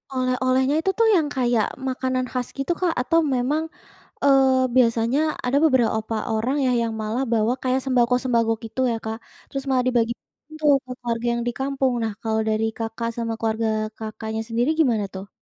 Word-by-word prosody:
Oleh-olehnya 255 Hz, +2 st, +1 dB
itu 385 Hz, +4 st, +1 dB
tuh 455 Hz, -, +5 dB
yang 320 Hz, -4 st, +2 dB
kayak 240 Hz, -4 st, +2 dB, 0.2 s
makanan 255 Hz, 0 st, -1 dB
khas 250 Hz, -1 st, -2 dB
gitu 275 Hz, +5 st, -1 dB
Kak 355 Hz, -3 st, +1 dB
atau 330 Hz, +6 st, +2 dB, 0.2 s
memang, 285 Hz, +6 st, 0 dB, 0.6 s
eee, 265 Hz, -2 st, +4 dB
biasanya 235 Hz, +1 st, +3 dB, 0.3 s
ada 250 Hz, +3 st, +2 dB
beberapa 230 Hz, -6 st, +2 dB, 0.2 s
orang 240 Hz, +6 st, 0 dB
ya 255 Hz, -, +2 dB
yang 225 Hz, -1 st, -1 dB
malah 220 Hz, +5 st, -1 dB
bawa 225 Hz, +2 st, +2 dB
kayak 260 Hz, +1 st, +1 dB
sembako-sembako 245 Hz, -2 st, +2 dB
gitu 225 Hz, +3 st, -4 dB
ya 225 Hz, -, -1 dB
Kak, 220 Hz, 0 st, -3 dB, 0.3 s
terus 275 Hz, -1 st, -3 dB
malah 255 Hz, -1 st, +2 dB
dibagiin 240 Hz, +5 st, -3 dB
tuh 305 Hz, -1 st, +3 dB
untuk 255 Hz, -1 st, -9 dB
keluarga 235 Hz, 0 st, -2 dB
yang 235 Hz, -, -2 dB
di -, -, +1 dB
kampung. 265 Hz, -1 st, 0 dB
Nah 220 Hz, -, -2 dB
kalau 220 Hz, 0 st, 0 dB
dari 215 Hz, +1 st, +1 dB
Kakak 225 Hz, 0 st, -3 dB
sama 230 Hz, -1 st, -2 dB
keluarga 225 Hz, 0 st, 0 dB, 0.3 s
Kakaknya 220 Hz, 0 st, -5 dB
sendiri 235 Hz, +4 st, 0 dB
gimana 230 Hz, -9 st, +2 dB
tuh? 190 Hz, +1 st, -7 dB
250 Hz, 170 wpm, -23 LUFS, 225-265 Hz, 0.6 s, tuh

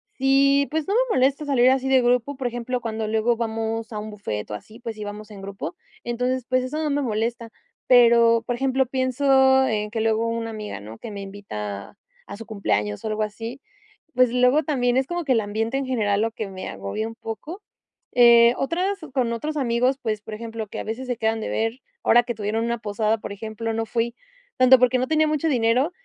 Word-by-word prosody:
sí, 275 Hz, +1 st, +3 dB
pues, 315 Hz, +1 st, -1 dB
no 400 Hz, -, 0 dB
me -, -, +2 dB
molesta 275 Hz, +3 st, +2 dB
salir 255 Hz, -3 st, +4 dB
así 265 Hz, 0 st, 0 dB
de 265 Hz, -1 st, +5 dB
grupo, 245 Hz, +3 st, +1 dB
por 260 Hz, -, -2 dB
ejemplo, 245 Hz, +1 st, -3 dB
cuando 220 Hz, -1 st, -3 dB
luego 220 Hz, +2 st, +1 dB
vamos 225 Hz, 0 st, -3 dB
a -, -, -4 dB
un 215 Hz, 0 st, -6 dB
bufet, 110 Hz, -, -5 dB
o, -, -, -3 dB
así, 215 Hz, -, -12 dB
pues, 230 Hz, -2 st, -6 dB
si 215 Hz, -, -7 dB
vamos 210 Hz, +1 st, -8 dB
en 200 Hz, -, -10 dB
grupo, 195 Hz, -, -6 dB, 0.3 s
entonces, 250 Hz, +1 st, -1 dB
pues, 255 Hz, 0 st, +2 dB
eso 255 Hz, +4 st, -4 dB
no 305 Hz, -, 0 dB
me 290 Hz, +1 st, +1 dB
molesta. 230 Hz, -1 st, -2 dB, 0.4 s
Pero, 235 Hz, -2 st, +6 dB
por 245 Hz, -, 0 dB
ejemplo, 265 Hz, +1 st, +1 dB
pienso 265 Hz, +1 st, +3 dB
en 210 Hz, -1 st, -1 dB
que 225 Hz, 0 st, -2 dB
luego 225 Hz, +1 st, +1 dB
una 230 Hz, 0 st, -3 dB
amiga, 215 Hz, -, -6 dB
¿no? 110 Hz, +3 st, -10 dB
Que -, -, -7 dB
me 200 Hz, -, -6 dB
invita 105 Hz, -, -7 dB, 0.3 s
a -, -, -8 dB
su 225 Hz, -, -9 dB
cumpleaños, 105 Hz, -, -2 dB
o, -, -, -1 dB
algo 215 Hz, 0 st, -1 dB
así, 225 Hz, +5 st, -6 dB, 0.6 s
pues, 250 Hz, -1 st, +4 dB
luego 250 Hz, +4 st, +4 dB
también 250 Hz, -5 st, +1 dB
es 265 Hz, 0 st, +1 dB
como 345 Hz, -1 st, -3 dB
que 270 Hz, -, 0 dB
el 225 Hz, -, +2 dB
ambiente 220 Hz, +5 st, -2 dB
en 275 Hz, -, -2 dB
general 210 Hz, -5 st, +1 dB
lo 225 Hz, -, +1 dB
que 220 Hz, -1 st, -5 dB
me 185 Hz, -1 st, -7 dB
agobia 100 Hz, -, -4 dB
un 225 Hz, -, -9 dB
poco. 300 Hz, -, -7 dB, 0.5 s
Eh, 235 Hz, -1 st, +7 dB
otras 370 Hz, +7 st, -1 dB, 0.2 s
con 240 Hz, -3 st, +1 dB
otros 305 Hz, +7 st, -3 dB
amigos, 250 Hz, 0 st, +1 dB
pues, 215 Hz, -2 st, -2 dB
por 215 Hz, 0 st, -7 dB
ejemplo, 225 Hz, -1 st, -6 dB
que -, -, -8 dB
a -, -, -3 dB
veces 230 Hz, +4 st, -5 dB
se 245 Hz, -2 st, -2 dB
quedan 225 Hz, 0 st, 0 dB
de -, -, -4 dB
ver, 225 Hz, +3 st, -1 dB, 0.2 s
ahora 240 Hz, -, +6 dB
que 240 Hz, 0 st, -4 dB
tuvieron 215 Hz, +1 st, -2 dB
una 235 Hz, 0 st, -1 dB
posada, 215 Hz, +1 st, 0 dB
por 205 Hz, -, -7 dB
ejemplo, 220 Hz, +2 st, -5 dB
no 225 Hz, 0 st, -1 dB
fui, 235 Hz, +1 st, -1 dB, 0.4 s
tanto 255 Hz, +1 st, +7 dB
porque 250 Hz, 0 st, +3 dB
no 255 Hz, -, -1 dB
tenía 315 Hz, +1 st, +3 dB
mucho 305 Hz, +1 st, 0 dB
dinero, 250 Hz, +4 st, +2 dB
235 Hz, 220 wpm, -23 LUFS, 220-260 Hz, 0.6 s, Eh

